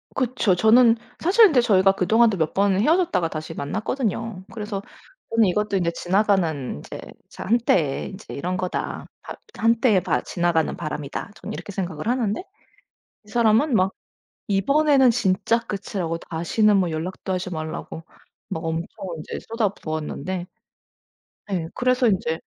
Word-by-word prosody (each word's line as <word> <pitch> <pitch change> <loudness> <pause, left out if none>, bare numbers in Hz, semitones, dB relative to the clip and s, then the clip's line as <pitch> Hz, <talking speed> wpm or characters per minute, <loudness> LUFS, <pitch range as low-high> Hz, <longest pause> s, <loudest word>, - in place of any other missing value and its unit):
그쵸. 250 -6 +1
저는 225 +4 +6 0.2
사실 405 +7 +6
근데 285 -10 +4
저희가 195 -4 +4
그동안도 220 +3 +3
몇 160 -2 0
번을 195 0 +2
헤어졌다가 330 - +2
다시 155 0 -6
만났거든요. 215 - -3
그래서 210 -3 -4 0.5
저는 230 -1 +3
이것도 205 +2 0
인제 170 -2 0
지나가는 175 -7 0
인제 - - -9 0.3
'자 - - -8
한때에 190 - +1
인제 200 +2 -10
이런 180 +6 -3
거다. 185 -1 -3 0.2
바 - - -8 0.2
한때에 230 -2 +3
바 - - 0
지나가는 170 -2 0
바람이다.' 150 +2 -5
저는 - - -7
이렇게 - - -7
생각을 185 -2 -4
하는데 235 - 0 0.8
이 - - -22
사람은 235 +5 +3
막 190 -2 +3 0.6
이번에는 270 +6 +4
진짜 230 0 +1
끝이라고 195 -6 -4
다시는 185 +6 +1
뭐 185 -3 +1
연락도 175 +4 -4
하지 185 0 -3
말라고 160 0 -6 0.5
막 160 - -4
엄청 165 +1 -2 0.3
인제 155 - -6
쏟아부었는데 185 - -3 1.1
예. 170 -4 -1
그래서 255 0 +2
인제 165 -5 0
195 Hz, 330 characters per minute, -23 LUFS, 170-230 Hz, 1.1 s, 저는